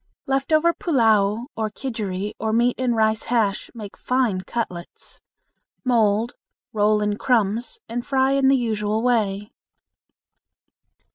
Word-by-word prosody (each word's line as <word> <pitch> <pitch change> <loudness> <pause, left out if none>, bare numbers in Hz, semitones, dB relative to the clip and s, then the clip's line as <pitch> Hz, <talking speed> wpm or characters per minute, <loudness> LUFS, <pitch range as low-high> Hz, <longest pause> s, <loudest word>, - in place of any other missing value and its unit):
Left 270 +2 -1
over 325 +2 +4
pullao 225 - +2
or 220 -1 -2
kidgeri 210 -5 -4
or 220 0 -1
meat 240 +2 +3
and 250 -2 +1
rice 220 0 +1
hash 220 -4 0
make 210 -3 -8
fine 250 -7 0
cutlets. 185 -5 -6 0.6
Mold, 225 -2 +2 0.4
roll 210 0 +2
in 210 0 -1
crumbs, 225 -1 0
and 240 +1 -4
fry 265 0 +1
in 275 -1 +3
the 270 0 +5
usual 220 -2 -1
way. 210 -4 0
225 Hz, 125 wpm, -22 LUFS, 210-250 Hz, 0.6 s, the